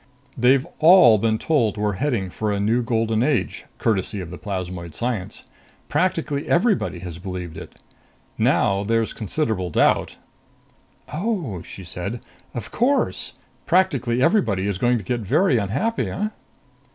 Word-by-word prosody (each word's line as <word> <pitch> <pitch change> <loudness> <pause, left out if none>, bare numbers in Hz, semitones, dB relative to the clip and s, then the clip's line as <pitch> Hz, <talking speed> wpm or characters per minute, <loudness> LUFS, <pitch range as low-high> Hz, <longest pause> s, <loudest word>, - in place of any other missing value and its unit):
"They've 130 +2 +3
all 155 - +7
been 110 +1 +1
told 115 -7 +1
we're 105 0 0
heading 105 -5 -1
for 105 +3 -2
a 100 - -1
new 110 +4 +2
golden 115 -1 0
age, 135 0 0
courtesy 105 -1 0
of 90 -2 -7
the 90 - -7
plasmoid 90 -5 -5
science. 115 -6 -3 0.5
Practically 160 -5 0
everybody 185 - +2
has 90 -2 -7
believed 90 -3 -6
it. - - -10 0.6
Now 100 +1 +2
there's 115 +1 0
considerable 110 - -2
doubt." - - +2 1.0
"Oh," 165 - -2
she 95 - -10
said. 90 +7 -5 0.4
"Of 115 -4 -6
course 270 +5 +1 0.3
practically 135 -10 +2
everybody 105 - +2
is 100 -2 -2
going 120 +2 +3
to 110 - -6
get 120 +6 -2
very 125 - +2
unhappy, 110 - -1
eh?" 210 +3 -2
115 Hz, 140 wpm, -22 LUFS, 95-145 Hz, 1.0 s, all